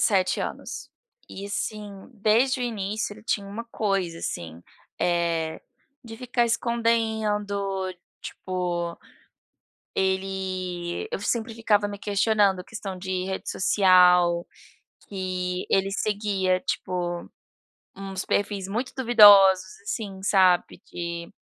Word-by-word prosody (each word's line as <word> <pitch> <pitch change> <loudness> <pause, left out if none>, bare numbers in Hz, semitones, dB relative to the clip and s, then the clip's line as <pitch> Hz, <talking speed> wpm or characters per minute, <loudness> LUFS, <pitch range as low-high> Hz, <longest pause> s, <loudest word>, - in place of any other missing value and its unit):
7 190 -4 +2
anos - - -6 0.4
e, 195 - -7
assim, 210 0 -4 0.2
desde 230 +5 +2
o - - -1
início 215 -2 -3
ele 215 - -13
tinha 205 -2 -1
uma 220 +4 -6
coisa, 195 -7 -1
assim, 85 - -6 0.4
eh, 170 -2 0 0.4
de 225 -1 -9
ficar 245 0 0
escondendo. 215 -5 0 0.3
Tipo, 175 -2 -3 1.0
ele 190 -2 -2
eu - - -2
sempre 225 +1 -1
ficava 210 -2 +2
me 205 - -6
questionando, 200 -2 +2
questão 195 -2 -7
de 185 0 -3
rede 190 0 -4
social, 180 -3 +4 0.6
que 185 -2 -3
ele 195 0 +2
seguia, 200 -3 0
tipo, 175 -1 -3 0.7
uns 195 -1 -5
perfis 200 -2 -1
muito 235 +6 -3
duvidosos, 200 -6 +7
assim, 200 -3 -5
sabe 185 -2 +3
de 170 0 -5
195 Hz, 105 wpm, -25 LUFS, 185-215 Hz, 1.0 s, duvidosos